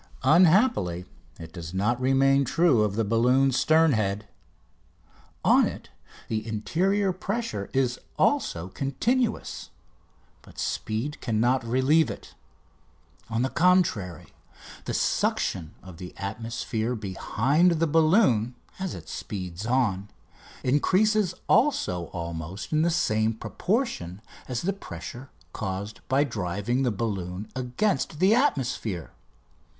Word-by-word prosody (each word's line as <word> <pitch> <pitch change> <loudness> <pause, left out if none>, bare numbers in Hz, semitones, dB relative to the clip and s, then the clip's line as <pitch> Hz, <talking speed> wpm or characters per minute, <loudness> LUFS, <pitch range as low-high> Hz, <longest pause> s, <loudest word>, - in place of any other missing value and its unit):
Unhappily, 155 - +4 0.3
it 80 0 -10
does 85 0 -7
not 120 +6 0
remain 135 +1 +4
true 140 -2 +3
of 105 -2 0
the 115 - +1
balloon's 125 +5 +3
stern 160 +3 +4
head. 105 -2 -1 1.2
On - - +5
it - - -8 0.4
the 110 -1 -2
interior 185 - 0
pressure 195 - -3
is 130 -2 0 0.2
also 85 +3 +1
continuous, 225 - -1 0.7
but - - -17
speed 115 +8 -3
cannot 120 +3 +1
relieve 130 +7 +3
it. - - -8 1.0
On 115 +2 0
the 130 - 0
contrary, 155 - +1 0.6
the - - -3
suction 80 -3 0
of 95 -3 -11
the 90 +1 -10
atmosphere 115 +2 -3
behind 125 - +1
the 165 0 +1
balloon, 155 - +3 0.2
as 190 -2 -3
it 80 -3 -10
speeds 95 +1 -6
on, 105 -6 +1 0.5
increases 185 - +2
also 90 - +2
almost 85 +3 -6
in 155 0 +2
the 170 - +3
same 110 -9 +1
proportion 110 - -2 0.3
as 125 +2 -3
the 195 +3 0
pressure 120 - -9 0.2
caused 100 +2 -4
by 135 +2 +3
driving 105 0 -2
the 130 - +2
balloon 100 -3 -4
against 130 +6 -1
the 190 +6 +4
atmosphere. 125 - 0
120 Hz, 115 wpm, -26 LUFS, 100-160 Hz, 1.2 s, On